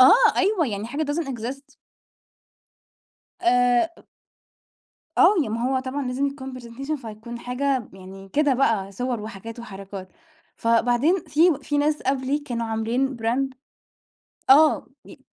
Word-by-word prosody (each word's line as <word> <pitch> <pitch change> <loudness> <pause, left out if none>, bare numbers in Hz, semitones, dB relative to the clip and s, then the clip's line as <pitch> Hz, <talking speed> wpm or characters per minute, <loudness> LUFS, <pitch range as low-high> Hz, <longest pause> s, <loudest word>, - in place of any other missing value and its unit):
آه، 435 - +7
أيوه 385 -4 +2
يعني 210 -2 -3
حاجة 280 +6 -3
doesn't 310 -2 -2
exist. 260 +3 -6 1.7
آآ، 245 -7 +4 0.2
أ - - -18 1.2
آه 415 - +7
يع - - -3
ما 230 +2 -2
هو 265 0 +1
طبعًا 265 +1 -4
لازم 255 +3 0
يكون 265 -2 -6
presentation 265 +6 -5
فتكون 225 +2 -8
حاجة 265 +3 0
م 210 -5 -12
يعني 195 +1 -11
كده 290 +5 +2
بقى 220 -7 +1
صور 245 +2 -2
وحاجات 220 +2 -8
وحركات، 195 -4 -8 0.5
فبعدين 245 +9 +2
في 330 +4 +4
و 295 - -1
في 290 +1 -2
ناس 300 +1 +1
قبلي 270 +2 0
كانوا 240 -5 -4
عاملين 235 +4 -1
brand 250 +4 -1 1.0
آه، 305 +3 +6 0.2
ي - - -15
255 Hz, 140 wpm, -24 LUFS, 230-280 Hz, 1.7 s, آه